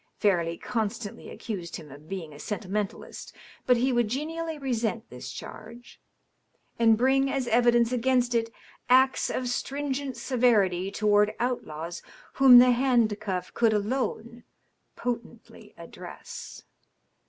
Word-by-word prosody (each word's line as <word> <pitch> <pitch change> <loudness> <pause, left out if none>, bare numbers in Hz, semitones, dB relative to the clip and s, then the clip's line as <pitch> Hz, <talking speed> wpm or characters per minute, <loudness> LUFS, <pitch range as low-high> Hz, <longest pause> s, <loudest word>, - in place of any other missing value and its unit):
Fairleigh 170 -5 +1
con 220 -3 -1
stantly 215 -2 -9
accused 180 -7 -6
him 150 -4 -10
of 145 +3 -14
being 175 -6 -6
a 145 - -12
sentimentalist; 205 +1 -5 0.4
but 250 -1 +5
he 255 +2 +1
would 240 -2 +2
genially 320 +6 -3
resent 235 -4 -2
this - - -8
charge, 240 +1 -11 0.8
and 225 -1 +5
bring 270 +3 +3
as 265 -3 -1
evidence 240 0 +3
against 250 0 +1
it 230 -1 0 0.4
acts 260 +1 +4
of 255 - -2
stringent 275 +1 -3
severity 205 -8 +2
toward 210 +1 +2
outlaws 175 -9 -3 0.3
whom 265 -2 +8
the 250 +1 +8
hand 240 -4 +2
cuff 185 -2 -4
could 230 -2 +3
alone 235 +1 -2 0.5
potently 240 -1 -6
ad - - -11
dress. - - -10
235 Hz, 130 wpm, -27 LUFS, 205-255 Hz, 0.8 s, whom